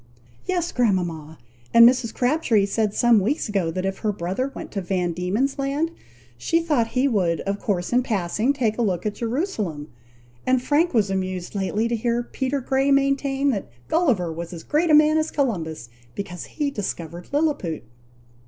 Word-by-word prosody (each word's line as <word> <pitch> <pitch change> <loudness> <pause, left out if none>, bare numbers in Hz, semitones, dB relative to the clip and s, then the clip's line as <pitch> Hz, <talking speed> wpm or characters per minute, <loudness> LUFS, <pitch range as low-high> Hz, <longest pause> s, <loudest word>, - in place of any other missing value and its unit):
"Yes, 350 -2 0
grandmama! 175 -9 -1 0.4
and 230 0 +10
Mrs. 245 -2 +2
Crabtree 245 -6 +2
said 210 0 -1
some 240 -2 +5
weeks 245 - 0
ago, 195 -5 0
that 185 +3 -3
if 195 0 -2
her 215 - 0
brother 195 +8 -3
went - - -7
to 200 - -3
Van 180 -1 -1
Dieman's 205 +12 -1
Land, 285 +4 0 0.5
she 330 - +2
thought 295 -9 +1
he 265 +2 +4
would 180 - +1
of 200 +1 -2
course 185 0 -2
in 250 - +4
passing, 215 +2 0
take 240 -5 -1
a - - +2
look 185 -5 0
at 210 - 0
Jerusalem; 225 - -3 0.5
and 255 0 +2
Frank 290 +4 +1
was 205 -4 +2
amused 185 -2 -3
lately 205 +3 0
to 235 - 0
hear 235 +1 0
Peter 265 +3 -2
Grey 270 +2 +1
maintain, 275 0 +2
that 200 - -4 0.2
Gulliver 235 - +1
was 170 +2 -6
as 165 - -8
great 320 +3 +1
a 305 - +7
man 305 +1 +5
as 310 - -1
Columbus, 165 - -2 0.3
because 180 -3 -6
he 295 -2 -2
discovered 175 - -5
Liliput!" 285 - 0
225 Hz, 175 wpm, -23 LUFS, 185-275 Hz, 0.5 s, and